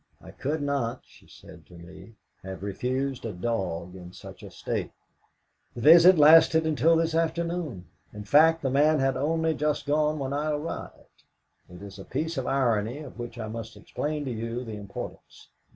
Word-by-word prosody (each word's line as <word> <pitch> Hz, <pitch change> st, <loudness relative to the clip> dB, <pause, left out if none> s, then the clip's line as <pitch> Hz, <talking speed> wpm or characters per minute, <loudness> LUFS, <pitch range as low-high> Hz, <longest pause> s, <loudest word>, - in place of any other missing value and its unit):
'I -, -, -13 dB
could 150 Hz, +2 st, -3 dB
not,' 135 Hz, -4 st, -2 dB
she -, -, -21 dB
said -, -, -15 dB
to 90 Hz, -, -16 dB
me, 95 Hz, +5 st, -13 dB, 0.3 s
'have 95 Hz, 0 st, -8 dB
refused 130 Hz, +6 st, -3 dB
a 115 Hz, -, -4 dB
dog 90 Hz, -4 st, -3 dB
in 90 Hz, -1 st, -11 dB
such -, -, -12 dB
a -, -, -10 dB
state.' -, -, -4 dB, 0.9 s
The 120 Hz, -, -6 dB
visit 170 Hz, +6 st, +8 dB
lasted 160 Hz, +1 st, +6 dB
until 160 Hz, +1 st, +3 dB
this 165 Hz, 0 st, 0 dB
afternoon 165 Hz, -, -2 dB, 0.3 s
in 105 Hz, 0 st, -8 dB
fact, 160 Hz, +7 st, +4 dB
the 135 Hz, -, 0 dB
man 150 Hz, +3 st, +3 dB
had 135 Hz, -1 st, +1 dB
only 160 Hz, +4 st, 0 dB
just 150 Hz, 0 st, -1 dB
gone 150 Hz, +1 st, +1 dB
when 135 Hz, -1 st, -3 dB
I 150 Hz, +2 st, -1 dB
arrived. 150 Hz, +2 st, -6 dB, 0.5 s
It 90 Hz, +2 st, -12 dB
is 100 Hz, -1 st, -10 dB
a -, -, -8 dB
piece 160 Hz, +9 st, -3 dB
of 125 Hz, -, -4 dB
irony, 120 Hz, -3 st, 0 dB
of 145 Hz, -4 st, -10 dB
which 120 Hz, 0 st, -7 dB
I 110 Hz, -, -5 dB
must 115 Hz, +1 st, -7 dB
explain 150 Hz, 0 st, -4 dB
to 130 Hz, -, -3 dB
you 115 Hz, +2 st, -4 dB
the 110 Hz, -, -7 dB
importance. 100 Hz, -1 st, -9 dB
135 Hz, 180 wpm, -26 LUFS, 110-155 Hz, 0.9 s, visit